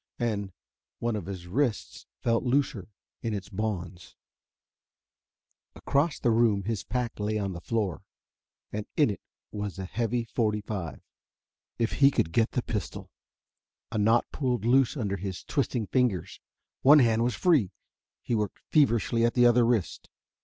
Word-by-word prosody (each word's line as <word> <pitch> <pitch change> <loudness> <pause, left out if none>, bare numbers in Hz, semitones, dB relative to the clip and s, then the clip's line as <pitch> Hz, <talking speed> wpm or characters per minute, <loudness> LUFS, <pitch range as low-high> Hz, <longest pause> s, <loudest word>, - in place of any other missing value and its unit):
And 105 -5 -2 0.5
one 120 -1 -1
of 100 -5 -5
his 95 -3 -6
wrists 115 +3 -2
felt 115 -1 +1
looser 125 -7 0 0.3
in 115 -2 -2
its 100 -1 -6
bonds. 95 -4 -4 1.6
Across 145 +2 0
the 120 - +3
room 110 -3 +3
his 110 -1 -2
pack 125 -3 -3
lay 105 +1 -1
on 100 -2 -2
the 85 - -7
floor, 105 -5 -2 0.7
and 105 0 -4
in 145 -8 +4
it 100 - -7 0.3
was 105 -2 -5
a 95 - -4
heavy 115 +4 -1
forty 110 -2 -1
five. 95 -7 -5 0.8
If 115 -1 0
he 140 -1 +8
could 80 - 0
get 115 +6 +1
the 125 - 0
pistol.... 105 -5 -5 0.8
A 110 - -1
knot 115 +3 +4
pulled 125 -6 -1
loose 130 +3 +3
under 100 -5 -2
his 95 -1 -5
twisting 125 -5 -1
fingers. 100 -8 0 0.4
One 145 +3 +8
hand 115 -4 +4
was 120 0 0
free. 150 - +3 0.5
He - - -2
worked 105 -3 -1
feverishly 120 - +3
at 120 - +2
the 120 -1 +5
other 120 0 +5
wrist. 115 -6 -1
115 Hz, 155 wpm, -28 LUFS, 100-120 Hz, 1.6 s, he